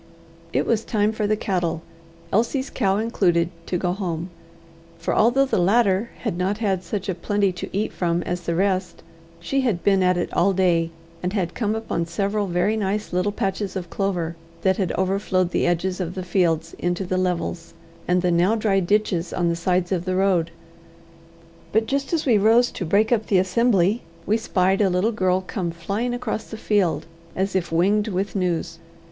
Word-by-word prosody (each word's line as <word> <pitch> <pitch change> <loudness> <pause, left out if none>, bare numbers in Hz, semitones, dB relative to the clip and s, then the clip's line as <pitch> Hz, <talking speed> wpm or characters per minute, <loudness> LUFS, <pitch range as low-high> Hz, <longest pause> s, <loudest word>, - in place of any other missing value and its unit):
It - - +1
was 225 -1 +1
time 210 -2 +1
for 215 -1 -1
the 215 - +2
cattle, 175 -6 -1 0.5
Elsie's 240 +6 +1
cow 195 -5 +1
included, 180 -6 +1 0.2
to 180 - 0
go 175 0 0
home; 175 -3 -4 0.7
for, - - -2
although 245 +5 +4
the 265 - 0
latter 200 +2 +3
had 205 -8 -2
not 190 +3 0
had 195 -5 0
such 195 +2 -4
plenty 205 -2 +1
to 180 - -6
eat 205 +3 -2
from 170 -1 0
as 175 0 -3
the 170 -1 -2
rest, 185 -1 0 0.4
she 270 +11 0
had 220 -10 0
been 195 -1 +3
at 180 -1 +3
it 175 - -2
all 195 +2 +3
day, 175 -3 +2 0.3
and 180 +1 -2
had 180 -5 -1
come 215 -2 -1
upon 220 -7 -2
several 200 +4 -1
very 180 +4 +1
nice 210 -1 -2
little 180 +3 +1
patches 195 0 -2
of 175 -3 -5
clover, 175 -4 -1 0.3
that 190 -1 +3
had 190 -4 0
overflowed 185 -1 0
the - - +1
edges 180 +2 0
of 180 0 -4
the 185 - -4
fields 170 -3 +1
into 175 +2 -1
the 185 - -2
levels 175 -2 -2 0.3
and 180 0 +2
the 180 - +2
now 175 +6 +3
dry 210 -3 +2
ditches 190 -2 0
on 175 -2 0
the 170 - 0
sides 180 +1 0
of 180 -2 -1
the 185 0 -1
road. 185 -3 +2 1.2
But 220 +1 +2
just 275 +3 -2
as 330 -3 0
we 230 -6 +4
rose 230 +4 +4
to 185 - -4
break 210 +7 +2
up 220 -3 +1
the 195 - +3
assembly, 195 +2 +2 0.2
we 215 - +2
spied 195 -3 +1
a 195 - +4
little 185 +5 +1
girl 185 -3 +1
come 185 -1 -3
flying 200 +9 -2
across 245 -2 -3
the 220 - -8
field, 205 -6 +1 0.3
as 190 +1 -1
if 180 -3 -1
winged 200 +6 +2
with 195 0 -2
news. 170 -3 -1
190 Hz, 190 wpm, -23 LUFS, 175-210 Hz, 1.2 s, although